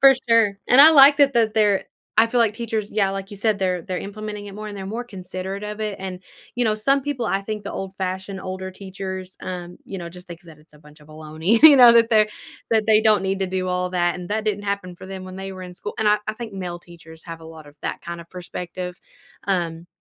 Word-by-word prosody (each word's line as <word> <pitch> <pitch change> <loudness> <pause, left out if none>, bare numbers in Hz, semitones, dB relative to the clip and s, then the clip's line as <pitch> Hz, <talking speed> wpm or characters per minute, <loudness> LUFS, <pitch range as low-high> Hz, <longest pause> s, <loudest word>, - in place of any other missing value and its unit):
For 270 0 +8
sure. 225 -4 +4
And 250 - +7
I 310 +3 +10
like 285 -1 +8
that 280 -2 +4
that 225 -3 +2
they're 210 -3 +3 0.3
I 230 - +6
feel 240 +1 0
like 225 -3 +3
teachers 220 -3 -3
yeah, 200 -2 +1
like 195 0 -6
you 205 - -9
said, 210 0 0
they're 185 -3 -1
they're 180 +2 -4
implementing 210 0 -7
it 200 - -9
more 215 +1 -7
and 205 - -8
they're 190 -1 -6
more 230 +4 -4
considerate 190 -2 -7
of 210 +1 -6
it. 210 -2 -3
And, 185 -1 -6 0.3
you 245 - 0
know, 215 -2 +2
some 275 +6 +1
people, 285 -4 -3
I 195 - 0
think 210 +1 -5
the - - -5
old-fashioned 190 0 -5
older 185 0 -6
teachers, 190 -1 -7
um, 180 -1 -7
you 195 - -6
know, 170 -2 -6
just 180 +1 -13
think 170 -1 -9
that 165 -3 -15
it's 150 0 -23
a - - -17
bunch 150 0 -18
of 150 - -19
a 155 - -13
looney 160 +7 0
you 305 -3 +10
know? 245 -2 +9
That 230 0 +4
they 215 -1 +4 0.4
that 220 -2 +3
they 215 -1 +5
don't 215 -2 +4
need 195 0 -1
to 190 - +1
do 185 0 -2
all 180 0 -1
that, 175 -1 +1
and 180 -1 -8
that 215 +1 -2
didn't 205 -1 -1
happen 200 -3 -3
for 185 - -11
them 190 -1 -7
when 185 0 -9
they 195 0 -6
were 185 -1 -9
in 180 - -9
school. 205 - -7
And 220 - +2
I 210 0 +4
I 215 - -1
think 225 -1 -7
male 180 -3 -5
teachers 165 -2 -15
have 165 -1 -8
a - - -13
lot 160 -1 -12
of 145 - -15
that - - -3
kinda 170 0 -7
perspective, 180 0 -6 0.5
um, 170 -3 -2
195 Hz, 260 wpm, -22 LUFS, 180-215 Hz, 0.5 s, I